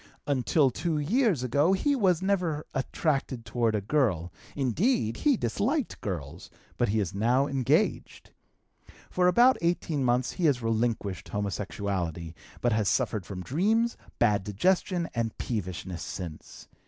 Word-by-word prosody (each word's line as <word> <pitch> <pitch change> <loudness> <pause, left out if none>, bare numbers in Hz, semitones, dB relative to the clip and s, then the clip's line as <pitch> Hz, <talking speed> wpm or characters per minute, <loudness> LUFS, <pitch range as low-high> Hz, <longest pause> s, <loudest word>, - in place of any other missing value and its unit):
Until 140 0 +2
two 160 +5 -2
years 185 - +1
ago 145 +8 +2
he 285 +9 +1
was 190 -8 +2
never 180 -6 0
attracted 135 -3 -1
toward 115 0 0
a 105 - 0
girl; 95 - 0 0.2
indeed, 135 - +1
he 290 -5 +2
disliked 225 - -1
girls; 85 -4 -5 0.3
but 120 - +1
he 110 +2 +1
is 100 -2 -2
now 120 +7 +2
engaged. 135 -3 0 0.8
For 180 0 +2
about 240 +8 +5
eighteen 170 -4 0
months, 125 0 +1
he 180 - -2
has 140 -5 +3
relinquished 115 -4 -1
homosexuality, 100 -5 -3 0.3
but 120 - +2
has 105 -3 +1
suffered 105 -5 0
from 90 -2 -6
dreams, 220 - +1 0.2
bad 105 -2 +2
digestion, 175 - +1
and 115 -2 -2
peevishness 95 -5 -4
since. 85 -5 -8
125 Hz, 135 wpm, -28 LUFS, 105-175 Hz, 0.8 s, about